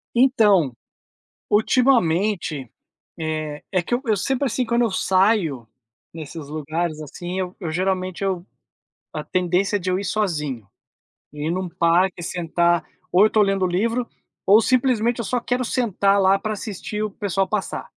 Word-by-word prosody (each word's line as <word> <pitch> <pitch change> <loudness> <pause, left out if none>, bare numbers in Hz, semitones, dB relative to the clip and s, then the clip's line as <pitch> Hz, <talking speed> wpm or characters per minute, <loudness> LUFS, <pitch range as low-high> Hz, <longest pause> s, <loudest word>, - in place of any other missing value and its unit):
Então, 210 - +4 0.8
ultimamente, 205 - +2 0.5
eh, 155 -2 -3
é 180 -2 +2
que 240 - -2
eu 235 -4 0
sempre 265 +7 0
assim, 250 +1 0
quando 235 +1 +1
eu 230 - +1
saio 185 - +2 0.5
nesses 155 -1 -8
lugares 155 +1 -3
assim, 175 +5 -5
eu 180 0 -4
geralmente 185 +2 -1
eu 190 -1 -2 0.7
a - - -4
tendência 185 +3 0
é - - 0
de 185 0 -5
eu 185 - +1
ir - - -5
sozinho. 150 - -2 0.6
Ir 150 +2 -3
num 185 +1 -2
parque, 175 +1 +1
sentar, 170 0 +1 0.3
ou 185 +3 +6
eu - - +8
estou 215 -1 +3
lendo 195 -1 +1
o - - +2
livro 230 +7 0 0.4
ou 205 +3 +6
simplesmente 245 -2 +2
eu - - -3
só 245 +4 -1
quero 250 +1 -1
sentar 200 -5 +1
lá 195 +1 +4
pra 215 +1 -3
assistir 210 0 -5
o 210 - -3
pessoal 195 -1 -1
passar. 210 -2 -3
190 Hz, 155 wpm, -22 LUFS, 170-215 Hz, 0.8 s, eu